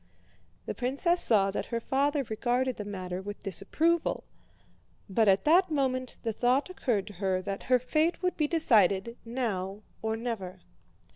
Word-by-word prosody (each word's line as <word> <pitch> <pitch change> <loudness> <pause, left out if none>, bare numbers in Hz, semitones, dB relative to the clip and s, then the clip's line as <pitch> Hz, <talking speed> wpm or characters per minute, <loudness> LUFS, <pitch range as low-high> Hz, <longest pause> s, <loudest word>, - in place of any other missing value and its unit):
The - - -3
princess 280 +8 0
saw 195 -4 +3
that - - -3
her 235 - -2
father 280 +4 +1
regarded 245 +3 -1
the 210 - -4
matter 185 -2 -5
with 205 +1 -8
disapproval, 310 - 0 0.8
but 215 +2 +2
at 195 0 +4
that 355 +4 +5
moment 260 -4 -1
the 225 -2 -1
thought 255 - +1
occurred 235 - -1
to 205 - -10
her 190 -1 +1
that 195 +1 -4
her 255 - +6
fate 310 +8 0
would 360 - +1
be 300 - +1
decided 230 - +3
now 215 -5 -3 0.2
or 220 0 -1
never. 195 -6 -5
235 Hz, 155 wpm, -29 LUFS, 195-275 Hz, 0.8 s, her